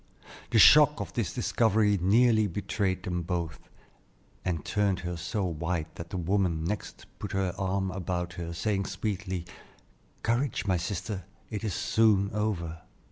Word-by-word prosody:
The - - +2
shock - - +8
of - - -5
this - - -1
discovery 105 -3 +2
nearly 110 +3 +4
betrayed 95 0 -2
them 90 -1 -2
both, 85 -3 -3 0.8
and 85 -5 -2
turned 100 -3 +1
her 90 0 -3
so 95 +4 -2
white 80 -1 -2
that 85 0 -8
the 95 - -4
woman 90 -2 +1
next 100 +3 -4
her - - -16
put 100 - -5
her 95 -2 0
arm 95 0 -1
about 90 -1 -3
her, 85 -1 -5
saying 95 +3 -1
sweetly: 95 -4 -3 0.8
"Courage, 120 +1 0
my 95 -3 +2
sister; 95 +1 -4 0.3
it 105 0 -4
is 105 -5 -2
soon 105 -3 +3
over." 85 -7 -2
95 Hz, 150 wpm, -29 LUFS, 85-105 Hz, 0.8 s, shock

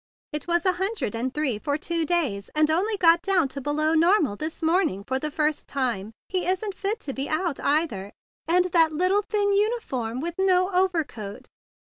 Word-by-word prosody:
It 300 +1 -2
was 345 0 +1
a 370 - +5
hundred 390 - -1
and 250 +3 -2
three 270 -7 -1
for 285 +4 -1
two 330 0 -1
days, 280 - -1
and 305 0 +3
only 405 +6 +1
got 335 -2 +5
down 365 -5 +2
to 275 - -6
below 305 +3 0
nor¬ 345 +6 +4
mal 255 -10 -1
this 315 - -5
morning 320 - +1
for 260 +5 -2
the 305 - -2
first 305 0 -1
time. 235 -7 -2 0.2
He 365 -1 -1
isn't 380 +2 0
fit 405 +4 -2
to 275 - -5
be 270 +2 -3
out, 315 -2 -1
either, 280 - 0 0.4
and 355 +2 +3
that 325 -2 +4
little 365 +6 +2
thin 410 -1 0
uniform 395 - -1
with 340 +5 -5
no 370 0 +3
overcoat!" 325 - -2
320 Hz, 190 wpm, -25 LUFS, 275-370 Hz, 0.4 s, a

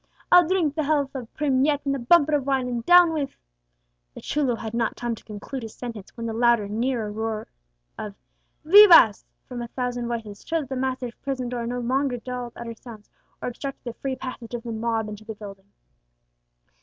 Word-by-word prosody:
I'll 355 -2 +7
drink 345 -5 +1
the 310 - -1
health 285 -2 0
of 250 -4 -7
Prim 270 -3 +2
yet 290 0 +1
in 275 - +1
a 275 - -2
bumper 305 +4 +4
of 285 -2 +1
wine, 265 -2 +1
and 240 -2 -3
down 350 +2 +7
with 290 -3 -3 0.4
" - - -49
The - - -9
chulo 275 -5 0
had 225 -1 -6
not 230 -1 0
time 240 -1 -2
to 225 - -10
conclude 215 +5 -7
his 225 -2 -8
sentence, 230 -3 -8
when 230 - -4
the 225 - -3
louder, 235 -2 +3
nearer 225 0 -1
noise 220 0 -3 0.5
of 205 -2 -6 0.5
vivas 340 - +8 0.2
from 245 -1 -6
a 235 - -5
thousand 245 0 -3
voices 220 -4 -5
showed 330 0 -1
that 270 - -9
the 265 - -3
massive 255 -2 -3
prison 260 -3 -3
door 240 -1 -3
no 245 +1 -2
longer 255 +1 0
dulled 245 0 -6
outer 235 -1 -6
sounds, 220 -2 -13 0.3
or - - -1
obstructed 275 +3 -7
the - - -41
free 270 -1 -2
passage 250 -2 -7
of 235 - -6
the 235 - -5
mob 225 -1 -1
into 210 0 -8
the 220 0 -7
building. 200 -1 -11
245 Hz, 205 wpm, -24 LUFS, 225-275 Hz, 0.5 s, vivas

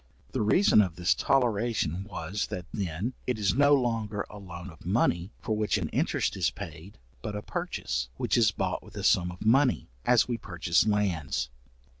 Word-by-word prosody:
The - - -1
reason 110 - +5
of 90 -5 -1
this 90 0 +2
toleration 115 - +1
was, 100 0 -3
that 90 - -5
then 100 +4 -2
it 125 -3 0
is 100 -3 +1
no 145 +1 +5
longer 115 -5 -1
a 105 - -9
loan 90 -1 -8
of 80 - -16
money 90 -2 +1
for 110 - -2
which 105 -1 +1
an - - -2
interest - - 0
is - - +1
paid, 85 +4 -9 0.2
but 105 - -5
a 105 - -4
purchase, 65 -1 -3
which - - 0
is 115 -3 +5
bought - - -2
with - - -14
a - - -4
sum 90 0 +3
of 90 +3 -9
money, 130 +3 +3
as 125 -2 +4
we 120 -2 -2
purchase 85 -1 +1
lands. 80 - 0
105 Hz, 185 wpm, -28 LUFS, 90-115 Hz, 0.2 s, reason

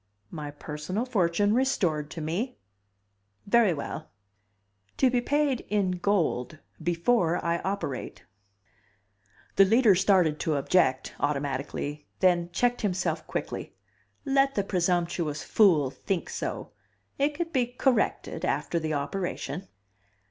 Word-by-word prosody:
"My 150 -2 -5
personal 150 +9 -4
fortune 205 -3 +2
restored 180 - +1
to 165 - -6
me 190 - -2 0.5
" 100 0 -47
"Very 225 -1 +4
well." 155 0 -5 0.4
" 100 0 -43
to 260 -2 +4
be 245 -1 +2
paid 285 -1 +1
in 200 -3 +1
gold 175 -7 0 0.2
before 175 +1 +2
I 170 0 +1
operate!" 190 -10 -4 1.3
The 195 - +8
Leader 225 +1 +5
started 180 -5 +3
to 155 - 0
object 135 -2 +2
automatically, 145 +1 -2
then 175 -2 +3
checked 245 +7 +1
himself 185 -3 -1
quickly. - - -5 0.5
Let 275 0 +2
the 200 - +1
presumptuous 175 -5 0
fool 160 -11 +4
think 190 +4 -3
so! - - -4 0.5
It 290 +2 +1
could 335 +1 -3
be 250 -3 +2
corrected 250 0 0
after 170 - 0
the 155 -1 -2
operation. 180 +4 -3
180 Hz, 120 wpm, -27 LUFS, 150-220 Hz, 1.3 s, The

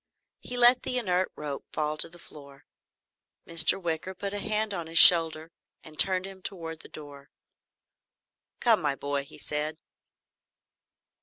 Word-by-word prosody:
He 250 - -8
let 245 +1 +6
the 250 - -3
inert 185 -5 -2
rope 145 -2 -8
fall 155 0 -4
to - - -1
the 175 - -14
floor. 140 -4 -16 0.8
Mr. 165 +2 +3
Wicker 175 +1 -6
put 200 +2 -7
a 205 - -5
hand 215 0 -2
on 170 -4 -6
his 165 +1 -3
shoulder 165 -2 +7 0.3
and 155 -1 -17
turned 185 -1 +3
him 195 -1 -13
toward 165 -4 -9
the - - -14
door. 145 -2 -14 1.3
"Come, 225 -5 +1
my 145 -3 -3
boy," 140 0 -5
he - - -16
said. 150 +1 -5
165 Hz, 150 wpm, -25 LUFS, 150-195 Hz, 1.3 s, shoulder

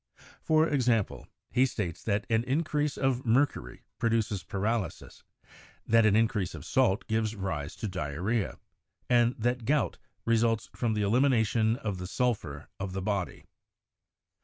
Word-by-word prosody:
For 155 0 +3
example, 120 - 0 0.2
he 130 +2 +4
states 90 -9 -4
that 100 -2 0
an 115 0 +2
increase 150 +1 0
of 135 -2 0
mercury 115 - 0 0.2
pro 115 - +2
duces 110 -4 0
paralysis, 105 -1 -3 0.6
that 115 -1 +5
an 105 - +4
increase 105 -4 +1
of - - -9
salt 115 -6 +2
gives 110 0 -1
rise 85 -7 -4
to 110 - -4
diar 75 -4 -4
rhea, 110 0 0 0.5
and 120 0 +4
that 120 +2 -1
gout 145 +3 +1 0.3
results 115 -1 +1
from 115 -3 0
the 105 - 0
elimination 115 -1 +3
of 105 -7 -4
the 90 - -5
sulphur 100 - -2
of 100 -2 -4
the 95 - -3
body. 100 -2 -2
110 Hz, 145 wpm, -29 LUFS, 100-125 Hz, 0.6 s, that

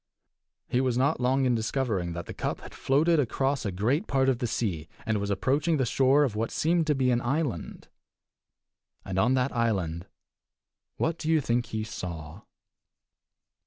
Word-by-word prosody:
He 125 - +1
was 125 -2 0
not 140 +5 +2
long 130 +2 +2
in 125 - +3
discovering 110 -6 -1
that 85 0 -5
the - - -7
cup - - -3
had - - -11
floated 155 +5 +2
across 135 -1 0
a - - -2
great 120 - 0
part 135 -1 +2
of 125 -3 +1
the 125 - -1
sea, 85 -9 -2 0.2
and 110 -2 0
was 100 0 -3
approaching 140 - +1
the 130 - +1
shore 135 +5 +4
of 125 -7 -1
what 115 +2 -1
seemed 165 0 +1
to 150 - +3
be 130 -1 +2
an 120 0 +1
island. 130 - -2 1.2
And 95 -1 -2
on 125 +7 +3
that 130 +1 0
island 95 -8 -1 0.9
what 165 0 -1
do 155 - -3
you 160 -1 +4
think 120 -3 0
he 110 -1 -3
saw? 85 -4 -7
125 Hz, 175 wpm, -27 LUFS, 105-140 Hz, 1.2 s, shore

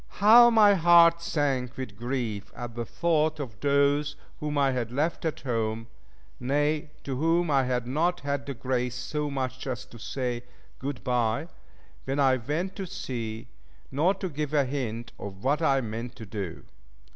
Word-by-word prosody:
How 235 +4 +8
my 215 -3 +6
heart 170 -1 +6
sank 135 -6 -1
with 130 -6 -6
grief 115 -3 -3
at 120 -1 -6
the 120 0 -4
thought 155 +5 +1
of 115 -8 -6
those 145 +1 +2 0.2
whom 150 -2 -2
I 140 -1 +3
had 120 -3 -2
left 155 +6 -1
at 160 - -2
home, 115 -3 -2 0.5
nay, 145 +4 0
to 135 -2 -3
whom 165 +2 +2
I 135 -2 +3
had 125 -1 -1
not 165 +8 0
had 140 -1 -2
the 140 - -4
grace 125 0 -1
so 150 +4 -3
much 130 -1 -3
as 130 0 -4
to 115 - -14
say 125 0 -3 0.4
"Good 135 -1 -5
bye" 125 +3 0 0.6
when 135 +2 -1
I 135 -2 +4
went 155 +10 -3
to 195 -2 -4
sea, 115 -7 -5 0.4
nor 160 +9 +2
to 190 - -4
give 150 -2 -3
a 140 -2 +4
hint 120 -5 -4
of 95 -1 -8
what 145 +4 +1
I 135 -4 +3
meant 115 +2 -5
to 110 - -9
do! 95 -4 -6
135 Hz, 170 wpm, -27 LUFS, 120-150 Hz, 0.6 s, How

